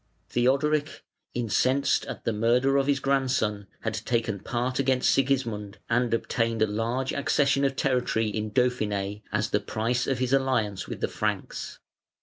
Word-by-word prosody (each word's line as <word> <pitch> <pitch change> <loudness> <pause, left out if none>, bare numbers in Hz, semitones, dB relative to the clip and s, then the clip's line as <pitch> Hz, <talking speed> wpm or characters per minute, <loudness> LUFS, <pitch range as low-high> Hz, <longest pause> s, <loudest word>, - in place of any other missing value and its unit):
Theodoric, 145 +5 +1 0.3
incensed 130 +4 +1
at - - -7
the 115 - +1
murder 120 +5 +2
of 135 0 +1
his 140 -1 +2
grandson, 130 -7 0
had 115 - -2
taken 110 -1 -1
part 125 +5 -2
against 130 -1 +3
Sigismund 115 -7 0
and 120 0 +2
obtained 115 -1 0
a - - +5
large 115 +5 -1
accession 140 -1 +2
of 135 -1 +1
territory 125 -5 +1
in 105 0 -3
Dauphiné 105 -4 0
as 105 0 -1
the 105 - +3
price 115 +4 -1
of 135 - 0
his 130 +1 0
alliance 125 -8 +1
with - - -6
the - - +1
Franks. - - -3
120 Hz, 150 wpm, -27 LUFS, 110-135 Hz, 0.3 s, a